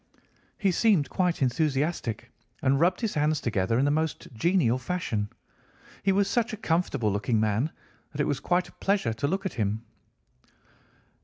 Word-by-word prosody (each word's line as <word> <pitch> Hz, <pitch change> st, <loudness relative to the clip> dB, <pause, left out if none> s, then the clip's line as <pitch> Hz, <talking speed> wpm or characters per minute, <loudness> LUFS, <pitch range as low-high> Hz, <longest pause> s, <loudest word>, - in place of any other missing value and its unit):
He 195 Hz, -3 st, +2 dB
seemed 185 Hz, -6 st, +3 dB
quite 180 Hz, -6 st, +1 dB
enthusiastic 135 Hz, -2 st, -1 dB, 0.3 s
and 135 Hz, 0 st, +3 dB
rubbed 180 Hz, +6 st, +2 dB
his 225 Hz, -3 st, -1 dB
hands 150 Hz, 0 st, +1 dB
together 110 Hz, -3 st, 0 dB
in 135 Hz, -, +3 dB
the 145 Hz, -, +3 dB
most 160 Hz, 0 st, -1 dB
genial 130 Hz, -, +2 dB
fashion. 125 Hz, -, -2 dB, 0.7 s
He 195 Hz, -, +2 dB
was 195 Hz, +1 st, +2 dB
such 235 Hz, +2 st, 0 dB
a -, -, -4 dB
comfortable 160 Hz, -, 0 dB
looking 105 Hz, +3 st, 0 dB
man 110 Hz, +8 st, +1 dB, 0.4 s
that 145 Hz, -, -9 dB
it -, -, +2 dB
was 140 Hz, -, -1 dB
quite 180 Hz, +1 st, +1 dB
a -, -, -15 dB
pleasure 195 Hz, -, 0 dB
to 140 Hz, +6 st, -1 dB
look 195 Hz, +5 st, -2 dB
at 190 Hz, -, -2 dB
him. 105 Hz, +2 st, -1 dB
150 Hz, 165 wpm, -27 LUFS, 115-180 Hz, 0.7 s, seemed